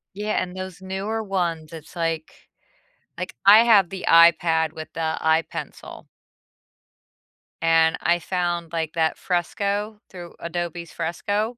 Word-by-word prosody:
Yeah, 210 +1 -1
and 180 0 -6
those 185 -1 -7
newer 195 +4 -3
ones, 170 -6 -3
it's 160 -2 -11
like 165 -2 -4 0.7
like 180 +1 -5
I 205 +2 +9
have 205 -6 +5
the 190 0 -7
iPad 165 -1 +5
with 155 -1 -8
the 160 -1 -2
iPencil 160 +1 -2 1.5
and 165 0 +3
I 175 0 +2
found, 175 -1 -2
like, 160 -2 -2
that 160 -1 0
Fresco, 200 +4 -2
through 175 -2 -11
Adobe's 170 0 -5
Fresco, 205 +7 -2
175 Hz, 125 wpm, -23 LUFS, 165-195 Hz, 1.5 s, I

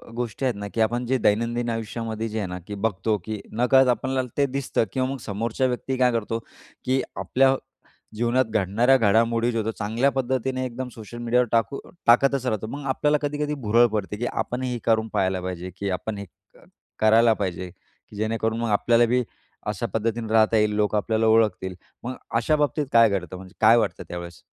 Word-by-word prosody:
गोष्टी 120 +2 -3
आहेत 125 - +1
ना, 100 0 -5
की 115 - 0
आपण 120 +3 +1
जे 130 +2 +1
दैनंदिन 115 +2 +1
आयुष्यामध्ये 115 0 -3
जे 110 - -5
आहे 100 - -2
ना, 90 0 -6
की 105 - -5
बघतो 105 +1 0
की 110 -2 -4
नकळत 125 +3 +4
आपल्याला 130 +2 0 0.2
ते 140 - +4
दिसतं 135 -3 -1
किंवा 130 -1 0
मग 135 - -3
समोरच्या 115 +5 -1
व्यक्ती 130 +1 -2
काय 125 -1 +4
करतो, 115 0 -2 0.5
की 130 +1 +2
आपल्या 135 +1 +2 0.6
जीवनात 120 +3 +2
घडणाऱ्या 110 +6 +3
घडामोडी 115 +1 +2
ज्या 115 -1 -1
होतात, 110 +1 -3
चांगल्या 115 +6 +1
पद्धतीने 130 0 -1
एकदम 125 +1 -5
सोशल 115 +1 -10
मीडियावर 120 +1 +1
टाकू 115 +4 +1 0.3
टाकतच 135 +2 +4
राहतो. 110 -3 -1
मग 140 +3 -7
आपल्याला 150 +3 +2
कधी 145 0 -2
कधी 150 - -2
भुरळ 120 +3 +6
पडते, 105 0 -3
की 120 - -2
आपण 125 +1 -2
हे 125 -1 -2
क - - -12
करून 110 -1 +2
पाहायला 95 -2 0
पाहिजे, 90 0 -5
की 100 -1 -3
आपण 100 +3 -3
हे 100 - -6 0.7
करायला 110 +1 +5
पाहिजे, 90 -3 -4 0.4
की 105 - -13
जेणेकरून 110 +1 -1
मग 115 - -1
आपल्याला 115 +3 +4
बी 125 +2 +1 0.4
अशा 105 +2 -2
पद्धतीने 115 0 -1
राहता 110 0 +4
येईल. 105 -1 +2
लोकं 105 0 +1
आपल्याला 110 +2 0
ओळखतील. 105 -5 +2 0.3
मग 125 +2 -4 0.2
अशा 120 +7 +2
बाबतीत 150 -1 0
काय 115 -1 +7
घडतं? 95 -2 -3
म्हणजे 95 +1 -12
काय 115 +2 +7
वाटतं 110 -3 -1
त्यावेळेस? 85 -1 -7
115 Hz, 190 wpm, -24 LUFS, 105-125 Hz, 0.7 s, काय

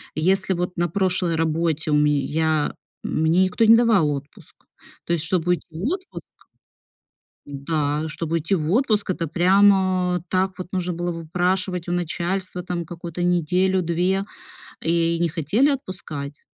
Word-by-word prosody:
Если 190 +4 +1
вот 180 +1 -3
на 175 0 +1
прошлой 180 -1 0
работе 160 -1 0
у - - +4
ме 150 -1 +3
я, 155 0 0 0.3
м, - - -1
мне 165 +4 +4
никто 185 +4 +1
не 225 +1 +8
давал 225 -9 +4
отпуск, 140 0 -8 0.5
то 170 - 0
есть, 165 -3 0
чтобы 175 0 0
уйти 180 - 0
в 165 +2 -8
отпуск 370 - -4 1.2
Да, 145 +1 -2
чтобы 160 +1 -4
уйти 165 +3 -1
в 160 -3 0
отпуск, 215 -3 +1
это 170 -2 -1
прям, 190 +5 +5
а, 185 -2 0
так 190 +1 +1
вот 185 - -5
нужно 180 -1 -2
было 175 +1 -3
выпрашивать 180 +2 -1
у - - -2
начальства 175 +2 -2
там 175 -1 -4
какую-то 170 +1 -6
неделю-две 180 +2 +1 0.6
и 170 0 +1
не 170 - +2
хотели 180 - +1
отпускать. 155 - -5
175 Hz, 150 wpm, -22 LUFS, 160-185 Hz, 1.2 s, не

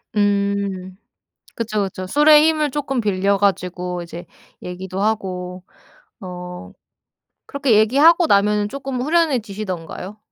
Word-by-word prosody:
음. 200 -2 -1 0.6
그쵸. 215 -3 -1
그쵸. 185 -1 -5
술의 295 +6 +6
힘을 310 -2 +1
조금 270 -3 -2
빌려 200 -1 +1
가지고 180 -2 -1
이제 170 +1 -9 0.4
얘기도 185 +1 -6
하고. 185 -4 -2 0.6
어 180 -1 -8 0.7
그렇게 275 -5 +1
얘기하고 295 +10 +5
나면은 205 -2 +2
조금 270 +1 -5
후련해지시던가요? 215 - -2
200 Hz, 255 characters per minute, -20 LUFS, 185-255 Hz, 0.7 s, 술의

